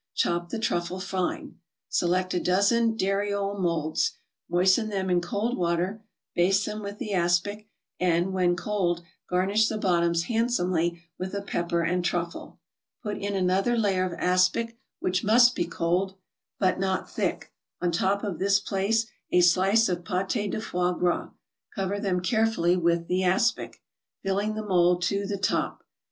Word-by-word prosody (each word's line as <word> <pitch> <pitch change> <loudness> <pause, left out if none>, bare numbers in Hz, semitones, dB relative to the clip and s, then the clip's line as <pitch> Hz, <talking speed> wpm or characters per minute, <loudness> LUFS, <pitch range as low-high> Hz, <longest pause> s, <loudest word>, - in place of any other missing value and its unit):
Chop 175 0 0
the - - -3
truffle 180 -4 -1
fine. 185 -1 -3 0.3
Select 180 +1 0
a 180 - +1
dozen 220 +6 +2
dariole 200 0 -1
molds, 165 -4 0 0.4
moisten 185 +5 +3
them 190 -2 -2
in 175 -1 +3
cold 215 +6 -2
water, 180 +4 -1 0.3
baste 195 +4 +3
them 215 0 -4
with 200 0 -6
the 210 - -4
aspic, 180 +4 0 0.3
and, 180 +1 +1
when 180 -2 +2
cold, 175 -3 -1 0.3
garnish 195 +4 +2
the 220 - -2
bottoms 170 -4 +2
handsomely 180 -6 0 0.2
with 185 +2 -4
a 200 - -2
pepper 170 -3 -1
and 175 +2 0
truffle. 170 -1 -3 0.5
Put 210 -2 -3
in 200 0 -3
another 195 +5 +1
layer 195 -4 +2
of 185 -1 -2
aspic, 185 +6 +2 0.2
which 180 0 0
must 240 +4 +6
be 175 - -1
cold, 180 +3 -1 0.4
but 185 -2 +1
not 190 -1 -1
thick; - - -3 0.3
on 175 -1 0
top 190 +4 0
of 200 -6 -3
this 200 +1 +3
place 205 +3 0 0.2
a 180 - +4
slice 190 +6 +4
of 175 -1 -2
pate 195 +3 -1
de - - -2
foie 180 -3 0
gras, 175 0 0 0.5
cover 195 -1 -2
them 190 -3 0
carefully 220 -3 +2
with 170 -1 +1
the 185 +1 0
aspic, 190 +6 0 0.4
filling 200 +2 -1
the 215 0 -4
mold 180 -2 +3
to 200 +2 0
the 200 0 -2
top. 195 - -1
185 Hz, 155 wpm, -26 LUFS, 175-205 Hz, 0.5 s, must